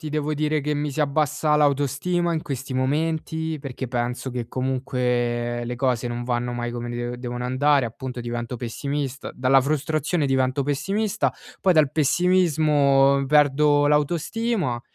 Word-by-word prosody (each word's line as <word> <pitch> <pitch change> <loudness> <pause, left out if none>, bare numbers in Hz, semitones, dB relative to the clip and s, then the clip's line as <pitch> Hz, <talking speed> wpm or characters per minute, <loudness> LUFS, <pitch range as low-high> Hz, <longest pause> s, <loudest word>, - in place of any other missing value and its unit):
ti 155 - -5
devo 150 0 -1
dire 150 0 0
che 150 +1 -1
mi 145 -1 -2
si 155 - -3
abbassa 150 +1 +1
l'autostima 145 +5 +1
in 160 - -1
questi 135 -2 -5
momenti, 160 +4 -1
perché 135 -2 -6
penso 125 +1 -2
che 120 -1 -4
comunque 125 -2 -1
le 120 +1 -4
cose 125 -1 0
non 120 0 -3
vanno 120 0 -2
mai 120 0 -3
come 120 0 -5
de 120 0 -4
devono 125 0 -5
andare, 135 +2 +2
appunto 125 +2 -6
divento 120 0 -4
pessimista 135 +3 -4
dalla 130 +1 +4
frustrazione 155 +3 0
divento 130 0 +1
pessimista, 195 +10 -1 0.3
poi 190 - +4
dal 155 -4 +4
pessimismo 150 -4 +3
perdo 145 0 +4
l'autostima 155 - 0
140 Hz, 145 wpm, -23 LUFS, 125-150 Hz, 0.3 s, dalla